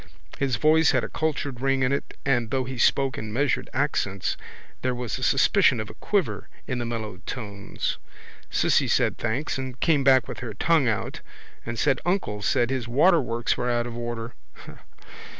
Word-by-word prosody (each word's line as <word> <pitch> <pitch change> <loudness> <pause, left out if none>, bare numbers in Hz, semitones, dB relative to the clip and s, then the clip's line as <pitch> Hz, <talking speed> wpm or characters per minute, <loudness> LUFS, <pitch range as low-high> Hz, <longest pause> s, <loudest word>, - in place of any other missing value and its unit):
His 135 -3 +1
voice 155 +5 +4
had - - +2
a - - -4
cultured 145 -5 -2
ring 135 -1 +2
in 130 - +2
it 140 - -3
and 120 -5 +1
though 130 +1 0
he 130 0 -6
spoke 135 0 +2
in 110 -1 -6
measured 140 +6 0
accents 125 -9 -1 0.5
there 125 -1 0
was 120 -3 -4
a - - -5
suspicion - - +4
of - - -5
a - - -13
quiver - - -1 0.2
in 125 - -3
the 120 - -3
mellow 110 -5 -4
tones. 100 -5 -4 0.5
Cissy - - +2
said - - +1
thanks 130 +5 -1
and 130 -1 -6
came 150 -5 +3
back 130 -1 +5
with - - -6
her 120 -4 -6
tongue 155 +2 +3
out 105 -4 -2 0.5
and 115 - -3
said 130 +3 +2
uncle 175 - -1
said 120 +4 +1
his 130 -3 -2
waterworks 125 -4 +2
were 125 - -1
out 120 -1 +1
of 120 -1 -6
order. 120 0 -5
125 Hz, 180 wpm, -25 LUFS, 115-140 Hz, 0.5 s, back